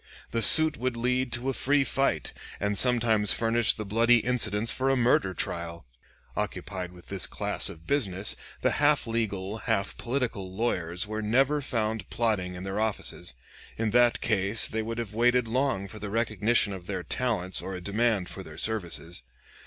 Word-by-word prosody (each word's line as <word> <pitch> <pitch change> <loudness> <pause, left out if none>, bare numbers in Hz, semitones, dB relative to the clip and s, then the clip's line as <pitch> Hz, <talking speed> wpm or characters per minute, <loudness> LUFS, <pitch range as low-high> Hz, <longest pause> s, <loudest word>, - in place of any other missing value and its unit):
The 115 - -1
suit 155 +5 +8
would 125 -1 -2
lead 125 +1 0
to 120 +3 -2
a - - -5
free 140 +2 +2
fight, 135 - -1 0.3
and 105 0 -1
sometimes 115 -3 +3
furnish 115 -1 +2
the 110 - -6
bloody 115 +4 +4
incidents 115 -2 +1
for 130 +1 0
a 135 - +3
murder 115 -6 +2
trial. 85 -2 -5 0.5
Occupied 90 -3 -4
with 90 -1 -15
this 95 -4 0
class - - 0
of 80 0 -12
business, 100 -8 0 0.3
the - - +2
half 145 0 +3
legal, 110 -3 -3
half 110 -4 -1
political 120 -7 -3
lawyers 90 -4 -1
were 110 +1 -4
never 135 +7 +2
found 110 -4 -2
plodding 105 -6 -1
in 90 - -7
their 95 +2 -3
offices. 110 - -3 0.4
In 110 -1 -1
that 120 +1 +3
case 110 0 +2
they 110 - -2
would 115 +1 -5
have 115 -3 -5
waited 120 +1 +2
long 125 -4 0
for 110 +3 -11
the 105 - -5
recognition 110 -1 +1
of 90 -2 -9
their 95 -3 -4
talents 105 -8 -1
or 95 - -6
a - - -5
demand 105 -1 0
for 95 - -8
their 80 -4 -11
services. 85 - -3
110 Hz, 175 wpm, -27 LUFS, 95-120 Hz, 0.5 s, suit